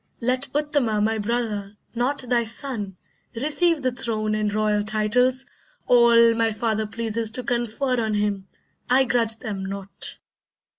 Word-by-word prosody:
Let 255 +3 +1
Uttama 290 -8 +1
my 220 +1 +1
brother, 210 -2 -3 0.2
not 250 +5 -1
thy 240 -1 +2
son, 220 -5 -3 0.4
Receive 305 +4 +1
the 255 - +1
throne 220 -3 -2
and 215 -1 0
royal 210 0 +1
titles, 245 +5 +1 0.4
all 235 -1 +6
My 225 0 +1
father 220 -1 -1
pleases 225 0 -2
to 250 - -2
confer 240 +1 -1
on 215 -1 -1
him. 205 -2 -1 0.4
I 260 +2 +5
grudge 230 -3 +1
them 205 -4 -5
not. 195 0 -5
230 Hz, 140 wpm, -23 LUFS, 215-250 Hz, 0.4 s, all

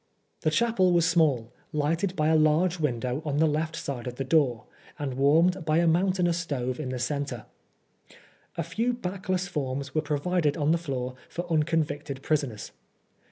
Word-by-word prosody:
The - - +1
chapel 190 0 +2
was 170 -1 +4
small, 145 -9 +2 0.2
lighted 165 +5 0
by 155 -2 +2
a 160 - +4
large 160 +3 +3
window 125 -2 -1
on 145 -2 -2
the 160 - +4
left 155 +2 0
side 135 -7 -5
from 125 -1 -5
the 135 - -3
door, 130 -5 +2 0.3
and 140 -3 -3
warmed 165 +7 +3
by 155 0 +1
a 170 - +3
moun 175 +4 +3
tainous 175 -2 +1
stove 130 -6 -3
in 145 -4 -3
the 130 - -3
centre. 130 -2 -3 1.1
A 170 - 0
few 225 +10 -1
backless 185 -4 -2
forms 140 -4 -3
were 155 - +2
provided 150 +1 0
on 150 0 +2
the 170 - +2
floor 130 -6 -3 0.2
for 175 - -4
unconvicted 150 -3 -1
prisoners. 135 -10 -1
155 Hz, 170 wpm, -27 LUFS, 140-170 Hz, 1.1 s, was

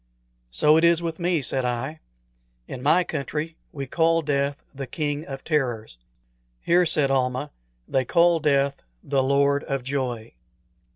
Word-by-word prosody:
"So 150 - +4
it 160 - +2
is 170 0 +4
with 165 0 -4
me," 170 -4 0
said 130 +1 0
I. 125 +6 -3 0.7
"In 125 - -7
my 160 +7 +4
country 155 +1 -4 0.2
we 140 -2 -5
call 165 +4 +2
death 140 -1 -1
the 135 -1 -6
King 145 +2 -3
of 135 -1 -7
Terrors." 120 - -2 0.6
"Here," 175 - +3
said 145 -3 +3
Almah, 130 +2 0 0.4
"they 130 - +1
call 170 +4 +3
death 140 -2 +1 0.2
the 135 -1 +1
Lord 140 +1 +2
of 135 -3 -3
Joy." 125 -4 -3
140 Hz, 150 wpm, -24 LUFS, 135-160 Hz, 0.7 s, So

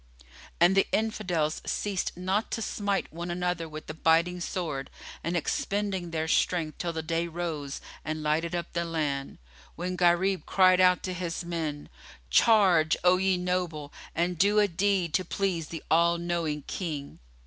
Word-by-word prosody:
And 175 +3 +5
the 195 - +4
Infidels 175 -8 0
ceased 195 -4 -2
not 190 +4 0
to 225 - -2
smite 200 -5 -2
one 170 +2 -5
another 175 -1 -2
with 155 0 -8
the 155 - -6
biting 165 +3 +2
sword 160 -7 -3 0.3
and 170 +1 -1
expending 195 +1 -1
their 160 -1 -2
strength 160 -2 +1
till 175 - -1
the 160 -1 -4
day 165 +2 -1
rose 160 -4 -4 0.2
and 155 0 -3
lighted 160 +3 0
up 170 -1 -4
the 170 0 0
land, 150 -5 -2 0.4
when 180 +2 -3
Gharib 180 +2 +2
cried 185 -1 +5
out 180 -1 +4
to 185 - -3
his 175 -1 -4
men, 160 -4 -3 0.4
"Charge, 180 - +5
O 180 0 +5
ye 190 0 +2
noble, 180 -5 -2 0.2
and 175 0 0
do 205 +3 +4
a 210 -1 +5
deed 185 -2 0
to 185 - +2
please 180 -3 -1
the 165 -1 -7
All 170 +1 +4
knowing 170 -4 -2
King!" 150 -6 -5
175 Hz, 160 wpm, -28 LUFS, 160-185 Hz, 0.4 s, And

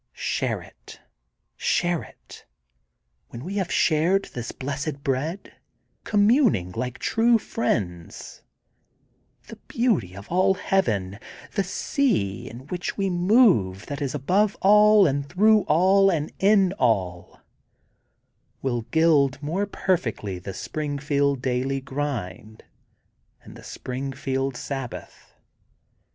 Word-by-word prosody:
Share - - -2
it, - - -15 0.6
share 175 -2 0
it! - - -15 0.8
When 120 - -9
we 195 +5 -5
have 190 -3 -2
shared 170 +5 +2
the 120 -2 -6
blessed 140 +1 -4
bread, 145 +8 -3 0.5
communing 205 - +3
like 125 +5 -4
true 230 +1 +2
friends, 90 - -4 1.0
the - - -11
beauty 205 - 0
of 100 - -10
all 190 +2 +3
Heaven, 105 - -1 0.3
the 200 - 0
sea 185 - -1
in 120 +3 -11
which 180 +4 -5
we 195 -2 0
move 175 - +3
that 145 -1 -6
is 140 0 -2
above 190 +9 +1
all 210 +1 +6
and 140 -2 -1
through 210 +2 +4
all 190 +5 +4
and 155 -5 -1
in 195 -2 +4
all, 95 -8 -1 1.2
will 120 -3 -1
gild 145 -3 +3
more 180 +7 -1
perfectly 115 - -2
the 95 +1 -8
Springfield 145 -2 -2
daily 130 +2 -1
grind 130 -6 -5 0.8
and - - -13
the - - -13
Springfield 135 0 -4
sabbath. 135 -4 -7
145 Hz, 110 wpm, -24 LUFS, 125-195 Hz, 1.2 s, all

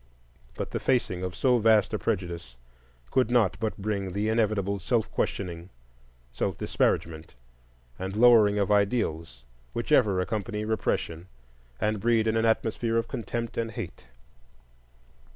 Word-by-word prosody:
But - - -5
the - - -2
facing 95 -8 0
of 90 -1 -4
so 125 -2 +3
vast 110 -1 +4
a - - 0
prejudice 85 -8 -3 0.5
could 130 -3 +2
not 115 -7 +3
but 110 -1 -2
bring 100 -2 -3
the 105 +2 0
inevitable 105 -3 0
self 110 +4 0
questioning, 85 -2 -3 0.6
self - - -2
disparagement, 80 -4 -1 0.6
and 95 +1 -4
lowering 110 -3 +6
of 100 0 +1
ideals 100 - 0 0.3
which - - -4
ever 100 -3 +4
accompany 105 +3 -2
repression 90 -5 -2 0.5
and 105 0 0
breed 115 0 +2
in 110 0 +1
an 115 0 +2
atmosphere 115 +1 +1
of 115 - 0
contempt 115 0 -4
and 115 -1 -3
hate. 100 - -7
105 Hz, 135 wpm, -27 LUFS, 90-115 Hz, 0.6 s, lowering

